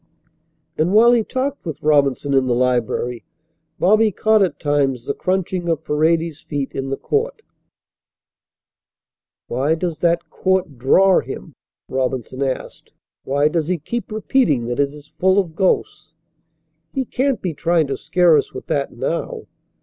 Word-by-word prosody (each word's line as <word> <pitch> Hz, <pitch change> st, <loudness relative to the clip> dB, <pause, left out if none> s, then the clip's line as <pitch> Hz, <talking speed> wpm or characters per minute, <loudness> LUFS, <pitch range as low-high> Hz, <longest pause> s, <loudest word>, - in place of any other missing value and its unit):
And 170 Hz, +5 st, +2 dB
while 230 Hz, +3 st, +7 dB
he 235 Hz, -2 st, +3 dB
talked 270 Hz, +5 st, -3 dB
with 160 Hz, -4 st, -6 dB
Robinson 145 Hz, -2 st, +2 dB
in 135 Hz, -1 st, +3 dB
the 120 Hz, -, +1 dB
library 125 Hz, -1 st, 0 dB, 0.5 s
Bobby 215 Hz, +4 st, +4 dB
caught 220 Hz, +2 st, +2 dB
at 180 Hz, -6 st, 0 dB
times 140 Hz, -4 st, 0 dB
the 140 Hz, -, -1 dB
crunching 185 Hz, -1 st, -2 dB
of 160 Hz, -2 st, -1 dB
Paredes's 160 Hz, +1 st, +1 dB
feet 145 Hz, -3 st, -4 dB
in 135 Hz, 0 st, -4 dB
the 135 Hz, -, -2 dB
court. 445 Hz, +1 st, -2 dB, 2.0 s
"Why 140 Hz, +6 st, 0 dB
does 165 Hz, -1 st, -3 dB
that 170 Hz, 0 st, +1 dB
court 185 Hz, -8 st, -1 dB
draw 185 Hz, +9 st, +5 dB
him?" -, -, -8 dB, 0.3 s
Robinson 130 Hz, 0 st, -3 dB
asked. 135 Hz, -2 st, -4 dB, 0.3 s
"Why 145 Hz, +2 st, +2 dB
does 155 Hz, 0 st, -1 dB
he 180 Hz, 0 st, 0 dB
keep 230 Hz, +10 st, -5 dB
repeating 215 Hz, -, +1 dB
that 120 Hz, -, -3 dB
it 140 Hz, -1 st, +2 dB
is 150 Hz, +1 st, -15 dB
full 190 Hz, +1 st, +3 dB
of 175 Hz, -5 st, 0 dB
ghosts? 160 Hz, -3 st, -1 dB, 0.8 s
He 265 Hz, -1 st, -2 dB
can't 265 Hz, +1 st, 0 dB
be 180 Hz, -3 st, -2 dB
trying 165 Hz, +1 st, +1 dB
to 135 Hz, -1 st, -3 dB
scare 175 Hz, +2 st, +3 dB
us -, -, -2 dB
with -, -, -7 dB
that -, -, -1 dB
now." -, -, -3 dB
160 Hz, 150 wpm, -20 LUFS, 140-190 Hz, 2.0 s, while